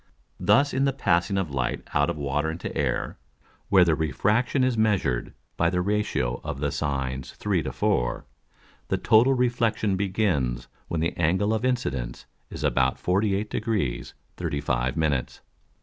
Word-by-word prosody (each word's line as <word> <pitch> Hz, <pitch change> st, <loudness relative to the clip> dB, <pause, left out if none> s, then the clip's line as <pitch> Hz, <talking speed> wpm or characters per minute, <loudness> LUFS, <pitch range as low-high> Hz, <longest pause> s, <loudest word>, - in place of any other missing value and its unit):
Thus 105 Hz, +10 st, +3 dB
in 135 Hz, +1 st, +2 dB
the 135 Hz, -, +1 dB
passing 95 Hz, -5 st, +1 dB
of 95 Hz, -6 st, -1 dB
Light 65 Hz, -2 st, -2 dB
out 70 Hz, 0 st, +2 dB
of -, -, -3 dB
Water 75 Hz, +2 st, -1 dB
into 80 Hz, +2 st, -5 dB
Air, -, -, -1 dB, 0.5 s
where 95 Hz, -3 st, +6 dB
the 85 Hz, -, +3 dB
Refraction 105 Hz, -, +1 dB
is 130 Hz, -2 st, +2 dB
measured 100 Hz, -, 0 dB, 0.2 s
by 85 Hz, -, +3 dB
the 90 Hz, 0 st, 0 dB
Ratio 90 Hz, -, -1 dB
of -, -, -4 dB
the 70 Hz, 0 st, -1 dB
Sines 65 Hz, -3 st, -3 dB
3 -, -, 0 dB
to -, -, -4 dB
4, -, -, 0 dB, 0.6 s
the -, -, 0 dB
total 120 Hz, +5 st, +4 dB
Reflexion 115 Hz, -5 st, +1 dB
begins 90 Hz, -, 0 dB, 0.2 s
when 80 Hz, -, -2 dB
the 85 Hz, -, -1 dB
Angle 95 Hz, +6 st, +2 dB
of 110 Hz, +1 st, -1 dB
Incidence 70 Hz, -, -2 dB, 0.2 s
is -, -, -7 dB
about -, -, +2 dB
48 100 Hz, +2 st, 0 dB
Degrees 100 Hz, -, -2 dB, 0.2 s
35 65 Hz, -1 st, -1 dB
Minutes. 75 Hz, -5 st, -1 dB
85 Hz, 150 wpm, -26 LUFS, 70-110 Hz, 0.6 s, where